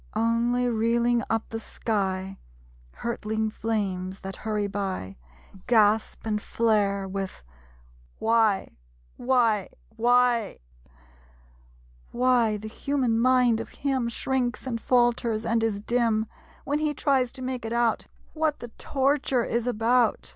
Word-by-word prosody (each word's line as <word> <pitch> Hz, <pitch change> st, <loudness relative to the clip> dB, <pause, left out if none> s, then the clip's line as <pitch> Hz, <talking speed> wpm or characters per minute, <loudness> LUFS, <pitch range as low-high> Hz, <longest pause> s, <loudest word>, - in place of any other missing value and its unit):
Only, 235 Hz, +2 st, +1 dB
reeling 235 Hz, +1 st, +2 dB
up 225 Hz, 0 st, -1 dB
the 225 Hz, -, -4 dB
sky, 195 Hz, -4 st, -3 dB, 0.5 s
Hurtling 220 Hz, -2 st, -3 dB
flames 195 Hz, -4 st, -3 dB
that 195 Hz, 0 st, -7 dB
hurry 210 Hz, -2 st, -2 dB
by, 195 Hz, -, -4 dB, 0.5 s
Gasp 220 Hz, -2 st, +3 dB
and 210 Hz, -1 st, -1 dB
flare, 205 Hz, -4 st, +1 dB
with 190 Hz, -, -5 dB, 0.7 s
Why 225 Hz, -3 st, +2 dB, 0.5 s
Why,... 235 Hz, -6 st, +2 dB, 0.3 s
Why?... 240 Hz, -1 st, +2 dB, 1.5 s
Why 240 Hz, -3 st, +2 dB
the 215 Hz, +1 st, -8 dB
human 250 Hz, -1 st, 0 dB
mind 250 Hz, -2 st, +4 dB
of -, -, -6 dB
him 265 Hz, -4 st, -1 dB
Shrinks, 250 Hz, +1 st, -2 dB
and 230 Hz, -3 st, -3 dB
falters 240 Hz, -3 st, +1 dB
and 230 Hz, 0 st, +1 dB
is 215 Hz, -3 st, -1 dB
dim 225 Hz, -1 st, +1 dB, 0.4 s
When 290 Hz, +2 st, 0 dB
he 305 Hz, -1 st, 0 dB
tries 265 Hz, -4 st, +1 dB
to 260 Hz, -1 st, -7 dB
make 255 Hz, -2 st, -3 dB
it 225 Hz, -, -4 dB
out: 235 Hz, -1 st, +1 dB, 0.3 s
What 310 Hz, -2 st, 0 dB
the 240 Hz, -, -9 dB
torture 270 Hz, -2 st, +1 dB
is 235 Hz, +1 st, -1 dB
about. 235 Hz, 0 st, +1 dB
230 Hz, 120 wpm, -26 LUFS, 215-245 Hz, 1.5 s, mind